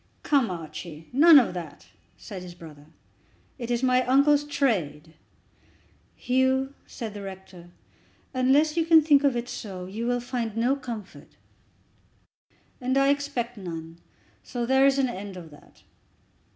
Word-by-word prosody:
"Come, 275 -7 +2
Archie, 165 -2 -8
none 310 +4 +8
of 245 -8 +3
that," 165 -5 -9 0.3
said 195 -4 -9
his 180 -1 -10
brother. 150 -4 -13 0.7
"It 235 -1 -5
is 240 +1 -1
my 255 0 +3
uncle's 285 +3 +4
trade." 175 - -1 1.0
"Hugh," 260 +1 +1
said 225 -5 -7
the 205 - -8
rector, 190 -2 -10 0.6
"unless 275 +5 +3
you 335 - +2
can 320 -1 +6
think 290 -2 +4
of 275 -3 +2
it 240 0 -4
so, 190 -7 -7
you 215 +6 -5
will 245 0 +1
find 235 -3 -4
no 245 +4 +2
comfort." 230 -7 -9 1.4
"And 260 +2 0
I 275 0 +4
expect 280 -4 -2
none, 165 -3 -8 0.4
so 240 -1 -4
there 265 +2 +4
is 275 0 +2
an 270 -1 +2
end 200 -4 -7
of 165 -3 -11
that. 145 - -19
240 Hz, 145 wpm, -26 LUFS, 185-270 Hz, 1.4 s, none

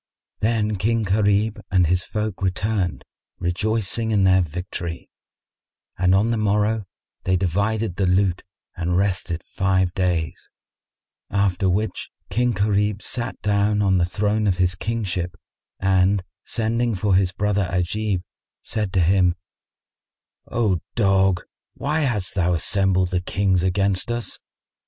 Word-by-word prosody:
Then 110 -1 +1
King 115 +4 +1
Gharib 105 +2 +1
and 95 -3 +3
his 90 +2 +1
folk 105 -3 -3
returned, 95 -4 -1 0.3
rejoicing 110 +4 0
in 105 -3 +3
their 95 0 +5
victory; 85 0 -5 0.8
and 90 +1 +3
on 105 +4 +2
the 115 - +1
morrow 105 0 +1 0.4
they 95 0 +2
divided 100 +3 0
the 95 - +1
loot 90 0 +2 0.3
and 90 +1 -1
rested 90 -3 -1
five 95 -2 0
days; 90 -4 -1 0.8
after 95 -1 +1
which 100 +1 -1 0.2
King 120 +5 +2
Gharib 105 0 0
sat 120 -1 -3
down 105 0 +2
on 95 -2 +3
the - - +3
throne 105 +3 0
of 95 -3 +1
his 90 -1 +2
kingship 95 -4 -3 0.4
and 95 0 +2 0.2
sending 115 0 0
for 100 +1 +1
his 95 -1 +3
brother 100 -1 0
Ajib, 90 +2 -1 0.4
said 105 -3 -2
to 95 - +3
him, 90 0 +3 1.1
"O 105 -7 +1 0.2
dog, 95 -4 +3 0.3
why 150 +3 -1
hast 120 -10 0
thou 90 -2 +1
assembled 95 0 +1
the 90 -1 0
Kings 95 0 +1
against 95 +2 +1
us? 120 -1 -3
95 Hz, 130 wpm, -22 LUFS, 90-105 Hz, 1.1 s, their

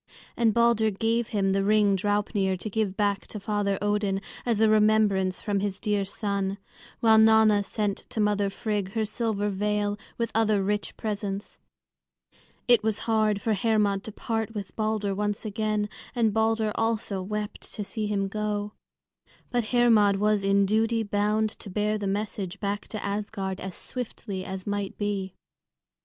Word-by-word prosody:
And 230 -2 +3
Balder 235 -1 +3
gave 225 +3 0
him 195 -2 0
the 195 0 +1
ring 205 -1 +4
Draupnir 205 -1 0
to 215 - -5
give 200 -2 -1
back 205 -2 0
to 210 - -6
Father 200 -1 0
Odin, 205 -1 +1 0.3
as 230 -3 +2
a 220 - +5
remembrance 210 -3 +3
from 205 -2 0
his 195 -1 -2
dear 205 -2 0
son; 200 0 -2 0.4
while 220 -1 +6
Nanna 220 -1 +6
sent 205 -1 -1
to - - -4
mother 205 -1 +2
Frigg 205 -1 -3
her 220 -1 0
silver 215 -2 -1
veil 205 +1 -1 0.2
with 230 -1 -1
other 215 -3 +2
rich 205 +1 -2
presents. 205 -2 -4 1.1
It 240 -3 +6
was 220 -1 0
hard 215 -2 +2
for 220 - +1
Hermod 205 -1 +1
to 220 - -5
part 225 +1 -3
with 200 -2 -6
Balder 215 -2 0
once 205 +2 -2
again, 215 0 -1 0.3
and 225 -3 +2
Balder 220 0 +1
also 225 -4 -1
wept 210 +2 -4
to 210 - -3
see 215 +1 -3
him 200 -1 0
go. 210 0 -2 0.8
But 240 -2 +1
Hermod 225 -4 +4
was 210 0 +2
in 195 0 +3
duty 225 +3 +1
bound 210 +1 +1
to 205 - -8
bear 210 +2 0
the 200 - -2
message 200 -1 -3
back 205 0 -3
to 215 - -5
Asgard 200 -2 -3
as 190 -1 -6
swiftly 215 -6 -6
as 190 -1 -6
might 205 -1 -3
be. 200 -2 -2
210 Hz, 160 wpm, -27 LUFS, 200-220 Hz, 1.1 s, while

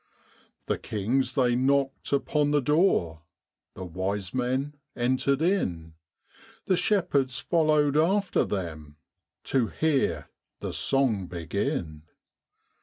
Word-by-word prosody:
The - - -1
kings 115 +6 -1
they 125 -3 +3
knocked 135 +1 0
upon 145 +1 +1
the 145 0 +3
door, 140 - +2 0.5
The 95 - -6
wise 95 +2 -3
men 130 +3 -1 0.2
entered 130 +4 +1
in, 85 - -1 0.7
The 185 - +2
shepherds 140 - +1
followed 155 -4 +2
after 190 +5 +2
them 80 -6 -5 0.5
To 130 -4 +1
hear 155 0 0 0.3
the - - -5
song 120 -9 +1
begin. 85 - -3
130 Hz, 105 wpm, -27 LUFS, 95-150 Hz, 0.7 s, they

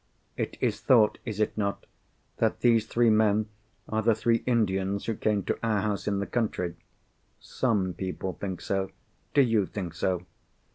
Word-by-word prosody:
"It - - -3
is - - 0
thought—is 110 -2 +3
it 110 - +1
not?—that 100 -2 -4
these 115 -3 +4
three 120 -1 +3
men 110 0 +3 0.4
are 110 0 0
the 110 0 +3
three 115 +1 +1
Indians 100 -4 +1
who 115 - 0
came 105 -2 0
to - - -2
our 110 -3 +1
house 105 -1 -2
in 100 -1 +1
the 100 - -1
country." 100 -8 -1 0.6
"Some 105 -8 0
people 95 +1 -4
think 95 -4 -5
so." 95 +1 -1 0.5
"Do 140 - +7
you 115 -5 +2
think 90 -5 -5
so?" 90 +1 -1
105 Hz, 155 wpm, -28 LUFS, 95-115 Hz, 0.6 s, Do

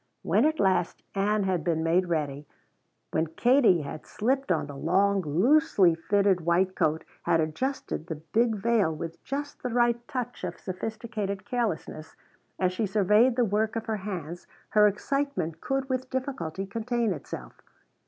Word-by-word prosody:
When - - +3
at 315 0 +1
last 185 -3 +1
Ann 205 +1 +1
had 185 -4 0
been 160 -1 0
made 175 +3 +2
ready, 145 -3 -2 0.6
when 160 - +1
Katie 225 - +4
had 145 +2 -8
slipped 260 +1 0
on 165 - +1
the 145 - -9
long 195 +7 +2
loosely 190 - +4
fitted 195 +2 +2
white 175 +3 +2
coat, 155 +1 +1 0.2
had 165 - +2
adjusted 160 - -2
the 160 - -3
big 220 +9 0
veil 210 -4 +2
with 165 +1 -7
just 285 +2 -5
the 250 - -2
right 240 0 +1
touch 245 -4 -4
of 175 -1 -4
sophisticated 205 0 -4
carelessness, 210 -10 -3 0.4
as 185 -1 +1
she 210 +3 -1
surveyed 210 +5 +4
the 245 -1 +3
work 220 +2 0
of 225 - -3
her 220 -1 -1
hands 175 -4 -6 0.2
her 210 -1 +6
excitement 205 - -2
could 270 0 -1
with 260 -1 -2
difficulty 260 - -3
contain 230 +1 -1
itself. 60 - -9
200 Hz, 155 wpm, -27 LUFS, 170-235 Hz, 0.6 s, her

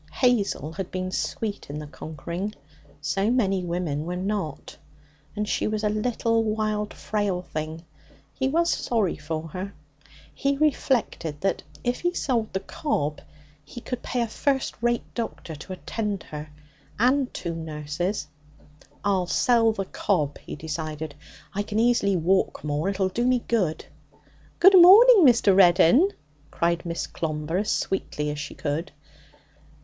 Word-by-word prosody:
Hazel 210 - +1
had 190 0 -5
been 185 0 -3
sweet 205 -1 -3
in 145 - -5
the 150 - -6
conquering; 170 +7 -6 0.5
so 195 +8 0
many 195 -7 +1
women 170 -4 -2
were 180 - -2
not. 185 -5 -3 0.6
And 210 0 -2
she - - 0
was 215 0 -2
a 210 - +2
little, 225 +1 +1
wild, 215 -1 -1
frail 205 -4 -2
thing. 155 0 -5 0.5
He 265 - -1
was 335 +5 +2
sorry 220 -7 0
for 155 +1 -5
her. 190 +5 -6 0.6
He 275 0 0
reflected 250 - 0
that 195 - 0 0.2
if 245 0 0
he 350 0 -1
sold 235 -5 0
the 190 - -2
cob 155 - -2 0.4
he 150 - -10
could 250 +1 -5
pay 250 - -2
a - - -2
first 270 +4 0
rate 240 0 +1
doctor 225 -8 -5
to 155 +5 -8
attend 205 0 -3
her 150 0 -8 0.5
and 255 +3 +2
two 170 -2 -4
nurses. 160 +2 -3 0.8
'I'll 190 -3 +1
sell 230 +3 +3
the 195 -3 -3
cob,' 155 -8 -1
he - - -8
decided. 155 0 -5 0.4
'I 205 - -1
can 210 +1 -4
easily 225 -4 +3
walk 185 +3 +1
more. 150 +4 -1
It'll 195 -1 0
do 235 +6 -1
me 255 -2 +2
good.' 185 -9 0 0.7
'Good 380 0 +9
morning, 405 - +9
Mr. 230 -5 +5
Reddin!' 185 - +6 0.4
cried 170 +1 0
Miss 170 0 -2
Clomber 155 +1 -3
as 210 +1 -1
sweetly 150 -6 -1
as 150 - -5
she 150 - -6
could. 155 +3 -3
195 Hz, 145 wpm, -25 LUFS, 160-230 Hz, 0.8 s, Good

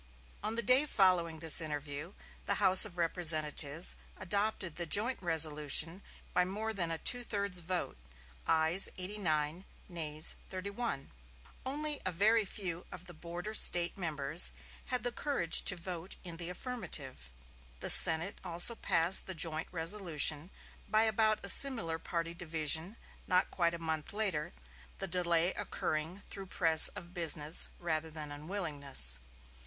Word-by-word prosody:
On 215 +1 -5
the 235 - -2
day 255 +7 +3
following 180 - 0
this 160 +1 +6
interview 150 +2 -7 0.3
the - - 0
House 190 0 +10
of 185 -4 -11
Representatives 160 -2 +1 0.2
adopted 200 -2 -3
the 175 -1 -6
joint 225 +10 0
resolution 160 +1 -1 0.3
by 180 - +1
more 215 +4 -6
than 175 -5 -2
a 165 - -4
two 245 +8 0
thirds 200 -5 -2
vote; 175 - -5 0.5
ayes 160 +4 +2
eighty 190 +3 -6
nine, 155 -1 -3 0.2
nays 155 -3 -1 0.2
thirty 190 +1 -7
one. 205 - -6 0.6
Only 295 +2 -3
a - - -3
very 215 +5 +1
few 180 -3 -7
of 180 - -11
the 175 - -12
border 175 +6 -9
State 175 -5 +3
members 155 -3 +2 0.3
had 250 -1 0
the 245 - -2
courage 235 - +3
to 195 - +5
vote 175 0 -6
in 170 -3 -9
the 170 0 -5
affirmative. 175 - -7 0.5
The - - +2
Senate 165 +5 +6
also 175 +5 +3
passed 175 -4 0
the 190 - -7
joint 160 0 0
resolution, 165 -3 -1 0.4
by 215 +1 +2
about 220 0 0
a - - -6
similar 200 -9 +3
party 170 0 -5
division, 165 +3 -3 0.3
not 185 0 0
quite 170 -2 -2
a - - -7
month 160 -1 -5
later; 200 -8 -2 0.5
the - - -5
delay 175 0 0
occurring 160 +5 -6
through 195 -1 -9
press 165 -3 +5
of 180 -3 -10
business 160 -3 +2
rather 160 -2 -3
than 155 -2 -10
unwillingness. 145 - 0
175 Hz, 145 wpm, -31 LUFS, 160-200 Hz, 0.6 s, House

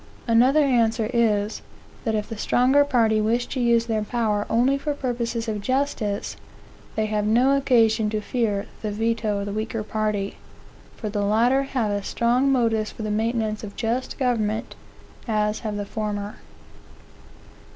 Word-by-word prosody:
Another 255 +6 +5
answer 230 -4 +2
is, 215 -3 +1 0.4
that 220 -1 +1
if 210 -1 -2
the 225 - -6
stronger 255 +6 +3
party 230 -6 +2
wish 235 +3 +1
to 265 - -5
use 235 -1 +3
their 220 -2 -1
power 210 -2 -1
only 245 +4 +3
for 285 +1 -2
purposes 235 -3 -2
of 210 -2 -2
justice, 255 -5 -1 0.6
they 220 - +1
have 210 -1 -1
no 250 +5 +4
occasion 225 -5 +3
to 215 0 -1
fear 210 -2 -1 0.2
the 215 - -2
veto 220 0 -1
of 200 - -3
the 205 - -4
weaker 220 +1 -3
party; 210 -2 -2 0.6
for 220 - -5
the 205 0 -2
latter 235 +6 +3
have 255 -6 -1
as 205 -1 -2
strong 245 +4 +2
motives 225 -4 +1
for 220 - -8
the 215 - -2
maintenance 220 0 -1
of 205 -1 -8
just 245 +3 -2
government, 225 -5 -1 0.5
as 210 -1 0
have 215 -2 -4
the 205 - -3
former. 205 -1 -4
225 Hz, 160 wpm, -24 LUFS, 210-245 Hz, 0.6 s, Another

